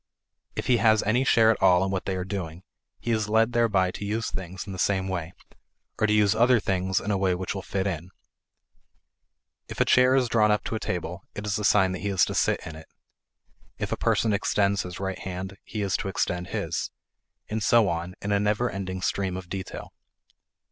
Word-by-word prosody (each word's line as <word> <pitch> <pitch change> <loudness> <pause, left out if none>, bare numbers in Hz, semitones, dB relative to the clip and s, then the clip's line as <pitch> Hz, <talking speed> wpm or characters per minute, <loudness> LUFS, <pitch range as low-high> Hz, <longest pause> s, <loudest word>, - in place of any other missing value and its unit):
If - - -3
he 125 - +4
has 110 0 +4
any 120 +5 +2
share 115 -3 +5
at 115 - -3
all 95 -1 +5
in 95 - -2
what 95 -1 -2
they 95 - -1
are 90 - -2
doing, 90 -3 -5 0.4
he 120 - -3
is 110 -2 0
led 115 +2 +3
thereby 105 -6 +2
to - - -7
use 110 +3 -2
things 95 0 -6
in 100 - -7
the 95 - -7
same 95 -2 +1
way, 90 -3 -3 0.7
or 110 - +3
to - - +1
use 105 -1 +4
other 120 +2 +4
things 95 -2 0
in 105 - -3
a 100 - +1
way 95 -2 +2
which 90 0 -3
will 95 - -4
fit 95 0 -2
in. 90 -2 -3 1.6
If - - -8
a - - +4
chair 125 +1 +5
is 130 -2 +3
drawn 110 -2 +3
up 105 0 +2
to - - -4
a 110 - -1
table, 90 -1 -4
it 105 - -5
is 105 +1 -1
a - - -4
sign 95 -1 +4
that 95 - -4
he 100 - -2
is 95 -3 +3
to - - -4
sit - - +1
in 80 - -7
it; 80 0 -12 0.9
if - - -4
a - - +1
person 110 -2 +1
extends 100 -1 +1
his 90 -1 -7
right 95 -1 -3
hand, 95 +1 -6
he 105 -2 -4
is 95 -2 0
to - - -4
extend 90 -2 -2
his; - - -3 0.6
and 110 +1 -3
so 115 -1 +4
on 85 +1 -3
in 100 - -2
a 100 - +3
never 105 +4 +1
ending 95 -1 -5
stream 95 -2 -1
of 90 -2 -9
detail. 95 -1 -6
100 Hz, 225 wpm, -26 LUFS, 95-105 Hz, 1.6 s, share